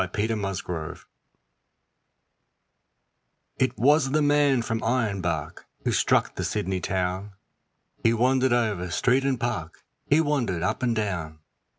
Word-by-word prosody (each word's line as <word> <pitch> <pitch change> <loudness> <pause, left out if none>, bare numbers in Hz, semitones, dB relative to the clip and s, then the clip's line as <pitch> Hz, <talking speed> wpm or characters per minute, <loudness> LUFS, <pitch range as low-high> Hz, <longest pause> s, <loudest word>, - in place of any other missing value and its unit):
The 95 - 0
Man - - -11
from 110 +1 0
Ironbark 90 -4 -5 2.5
It - - +1
was 140 +4 +4
the 155 +3 +2
man 145 -4 +3
from 115 0 -2
Ironbark 95 -9 -1 0.2
who - - 0
struck - - +2
the - - -4
Sydney 95 -3 -1
town, 95 +2 -2 0.7
He 115 - +5
wandered 130 +2 +2
over 105 -7 0
street 125 +10 +2
and 135 -3 0
park, 115 -10 -4 0.2
he 145 - +4
wandered 125 - 0
up - - -1
and 120 -2 +1
down. 90 -8 -3
110 Hz, 130 wpm, -26 LUFS, 90-130 Hz, 2.5 s, He